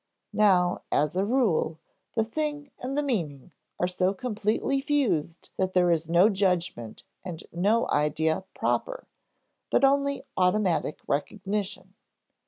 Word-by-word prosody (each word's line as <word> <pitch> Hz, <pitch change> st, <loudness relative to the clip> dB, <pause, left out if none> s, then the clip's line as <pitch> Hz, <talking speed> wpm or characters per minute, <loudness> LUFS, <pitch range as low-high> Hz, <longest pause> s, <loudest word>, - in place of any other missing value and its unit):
Now, 185 Hz, -4 st, +3 dB
as 150 Hz, +3 st, +1 dB
a 190 Hz, -, +2 dB
rule, 200 Hz, -9 st, +1 dB, 0.4 s
the 225 Hz, -, +3 dB
thing 295 Hz, +4 st, -3 dB
and 265 Hz, +3 st, -4 dB
the 295 Hz, -, +2 dB
meaning 170 Hz, -, -3 dB, 0.3 s
are -, -, +2 dB
so 185 Hz, +2 st, 0 dB
completely 230 Hz, +3 st, -1 dB
fused 235 Hz, -, -1 dB
that 185 Hz, 0 st, 0 dB
there 180 Hz, -1 st, +4 dB
is 165 Hz, -1 st, 0 dB
no 175 Hz, +4 st, +6 dB
judgment 180 Hz, -, -1 dB, 0.2 s
and 175 Hz, -4 st, -7 dB
no 205 Hz, +7 st, +2 dB
idea 160 Hz, +4 st, +1 dB
proper, -, -, -1 dB, 0.6 s
but -, -, +4 dB
only 280 Hz, +1 st, +2 dB
automatic 180 Hz, -4 st, +1 dB
recognition. 190 Hz, +4 st, -3 dB
190 Hz, 125 wpm, -27 LUFS, 170-240 Hz, 0.6 s, no